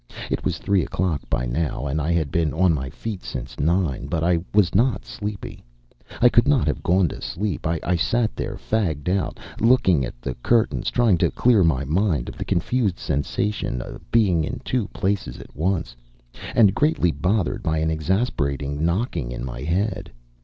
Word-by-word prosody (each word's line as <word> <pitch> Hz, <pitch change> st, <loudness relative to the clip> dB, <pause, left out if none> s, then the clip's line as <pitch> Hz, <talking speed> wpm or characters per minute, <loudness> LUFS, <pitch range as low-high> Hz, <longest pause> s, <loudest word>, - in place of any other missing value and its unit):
It -, -, -1 dB
was -, -, -1 dB
three 100 Hz, -2 st, +1 dB
o'clock 85 Hz, -2 st, -1 dB
by 60 Hz, 0 st, 0 dB
now 70 Hz, +2 st, -2 dB
and 75 Hz, +3 st, -1 dB
I 80 Hz, +3 st, 0 dB
had 80 Hz, -5 st, 0 dB
been 80 Hz, -3 st, +1 dB
on 90 Hz, 0 st, +4 dB
my 65 Hz, -3 st, -3 dB
feet 100 Hz, +6 st, -6 dB
since 65 Hz, -2 st, -7 dB
nine, 80 Hz, -4 st, 0 dB
but 80 Hz, +2 st, -1 dB
I 85 Hz, 0 st, +3 dB
was 100 Hz, -4 st, +3 dB
not 120 Hz, +6 st, +2 dB
sleepy; 105 Hz, -1 st, -6 dB, 0.6 s
I 120 Hz, -, +7 dB
could 120 Hz, 0 st, +4 dB
not 145 Hz, -4 st, +3 dB
have 75 Hz, -, -1 dB
gone 90 Hz, 0 st, +3 dB
to -, -, -8 dB
sleep. 100 Hz, -3 st, -3 dB
I 85 Hz, +2 st, 0 dB
sat 115 Hz, +7 st, +1 dB
there, -, -, -4 dB
fagged 85 Hz, -9 st, -1 dB
out, 95 Hz, +1 st, -1 dB, 0.2 s
looking 115 Hz, -, +4 dB
at -, -, -6 dB
the 65 Hz, +1 st, -4 dB
curtains, 115 Hz, -, +2 dB
trying 115 Hz, -8 st, +3 dB
to -, -, +3 dB
clear 120 Hz, -6 st, +3 dB
my 70 Hz, -5 st, +2 dB
mind 80 Hz, -, 0 dB
of -, -, -9 dB
the -, -, -3 dB
confused 100 Hz, +1 st, 0 dB
sensation 75 Hz, +1 st, -2 dB
of -, -, -7 dB
being 95 Hz, -8 st, +3 dB
in -, -, -4 dB
two 125 Hz, -6 st, 0 dB
places 95 Hz, -10 st, -2 dB
at -, -, -13 dB
once, 80 Hz, -4 st, -1 dB, 0.6 s
and 105 Hz, -5 st, +6 dB
greatly 145 Hz, -, +2 dB
bothered 95 Hz, +5 st, 0 dB
by 80 Hz, 0 st, 0 dB
an 80 Hz, +1 st, +1 dB
exasperating 75 Hz, -, -1 dB
knocking 85 Hz, -, -1 dB
in -, -, -5 dB
my -, -, -6 dB
head. 95 Hz, +4 st, -1 dB
85 Hz, 180 wpm, -23 LUFS, 75-105 Hz, 0.6 s, I